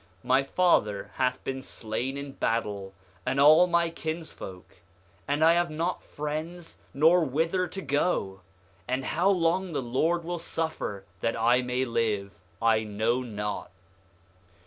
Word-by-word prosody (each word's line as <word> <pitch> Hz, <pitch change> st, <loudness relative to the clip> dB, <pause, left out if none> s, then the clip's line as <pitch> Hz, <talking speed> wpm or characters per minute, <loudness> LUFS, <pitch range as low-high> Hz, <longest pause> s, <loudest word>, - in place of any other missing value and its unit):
My 130 Hz, +2 st, +4 dB
father 105 Hz, -, +1 dB
hath 125 Hz, -1 st, 0 dB
been 135 Hz, 0 st, -3 dB
slain 125 Hz, +3 st, -4 dB
in 140 Hz, 0 st, -6 dB
battle, 105 Hz, -7 st, -2 dB, 0.3 s
and 130 Hz, +2 st, -1 dB
all 155 Hz, +5 st, +7 dB
my 170 Hz, -1 st, +2 dB
kinsfolk, 155 Hz, -, -7 dB, 0.5 s
and 145 Hz, +3 st, +2 dB
I 165 Hz, -, +7 dB
have 175 Hz, 0 st, +2 dB
not 165 Hz, +3 st, -2 dB
friends 155 Hz, +4 st, -5 dB
nor 165 Hz, +5 st, +5 dB
whither 165 Hz, +6 st, 0 dB
to 195 Hz, -, -7 dB
go; 140 Hz, -, 0 dB, 0.5 s
and 130 Hz, +1 st, -1 dB
how 175 Hz, +5 st, +2 dB
long 180 Hz, -1 st, +1 dB
the -, -, 0 dB
Lord 160 Hz, +8 st, +1 dB
will 175 Hz, +1 st, -3 dB
suffer 160 Hz, -12 st, -3 dB
that 115 Hz, +4 st, -1 dB
I 120 Hz, +3 st, +4 dB
may 125 Hz, +1 st, -1 dB
live 105 Hz, -4 st, -1 dB, 0.2 s
I 115 Hz, -1 st, +3 dB
know 110 Hz, +4 st, 0 dB
not. 105 Hz, -4 st, -4 dB
135 Hz, 140 wpm, -28 LUFS, 115-165 Hz, 0.5 s, all